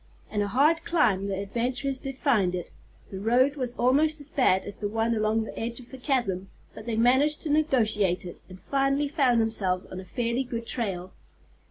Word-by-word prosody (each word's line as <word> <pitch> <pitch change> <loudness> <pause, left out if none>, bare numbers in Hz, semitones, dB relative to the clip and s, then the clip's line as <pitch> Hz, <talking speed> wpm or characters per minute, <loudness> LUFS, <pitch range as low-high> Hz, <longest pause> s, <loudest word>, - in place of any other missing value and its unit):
And 210 - 0
a 205 - 0
hard 290 +10 +3
climb 225 - +2
the 195 -1 -2
adventurers 245 +6 -2
did 270 -1 -6
find 205 -12 +2
it. 180 - -6 0.4
The 190 - -5
road 250 +7 +3
was 250 -4 -3
almost 300 +6 +2
as 290 +1 -9
bad 195 - +3
as 205 - -7
the 205 - -2
one 225 +2 0
along 215 0 +1
the - - -8
edge 235 +2 -3
of 250 - -14
the 265 - -9
chasm, 205 -9 -1 0.2
but 220 - -11
they 230 - -1
managed 260 +6 +3
to 305 - -2
negotiate 220 - +2
it, 175 - -9
and 185 0 -11
finally 275 +3 0
found 270 -6 +2
themselves 195 -5 0
on 185 - -8
a 185 - -9
fairly 235 +4 -1
good 235 -2 -5
trail. 190 -7 -3
235 Hz, 200 wpm, -27 LUFS, 200-270 Hz, 0.4 s, hard